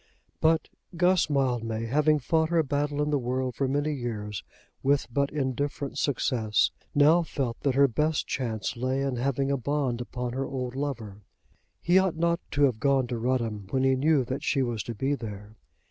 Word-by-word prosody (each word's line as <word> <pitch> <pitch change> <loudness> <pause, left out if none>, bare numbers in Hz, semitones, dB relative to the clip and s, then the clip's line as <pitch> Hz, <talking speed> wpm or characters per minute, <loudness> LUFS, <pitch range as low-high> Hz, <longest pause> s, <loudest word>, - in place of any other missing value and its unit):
But 160 0 +3 0.3
Guss 180 -1 +3
Mildmay, 120 -5 0
having 150 +5 +3
fought 160 +3 +1
her 170 -1 +3
battle 145 +1 -1
in 150 - -1
the 145 - +2
world 130 +1 -2
for 135 +3 -1
many 145 +3 0
years 105 - -4 0.4
with 140 +1 +2
but 140 +1 +1
indifferent 140 0 -2
success, 120 -5 +1 0.2
now 150 +4 +6
felt 135 -7 -3
that 135 -3 0
her 140 0 +6
best 150 +5 0
chance 115 -5 -3
lay 130 +3 -1
in 135 -3 -1
having 135 +2 0
a 140 - +1
bond 130 -2 -1
upon 125 0 -4
her 135 +1 -2
old 125 -2 -4
lover. 120 -8 -4 0.6
He 175 +2 +5
ought 190 -3 +1
not 170 0 +1
to 145 -2 +1
have 125 -6 +3
gone 135 -1 +2
to 120 -2 -2
Rudham 115 -5 -1
when 130 +3 0
he 135 0 +4
knew 140 0 +2
that 130 +4 -3
she 135 -2 +1
was 120 -4 -2
to 120 - -5
be 135 +6 0
there. 105 -4 -7
135 Hz, 185 wpm, -27 LUFS, 120-145 Hz, 0.6 s, now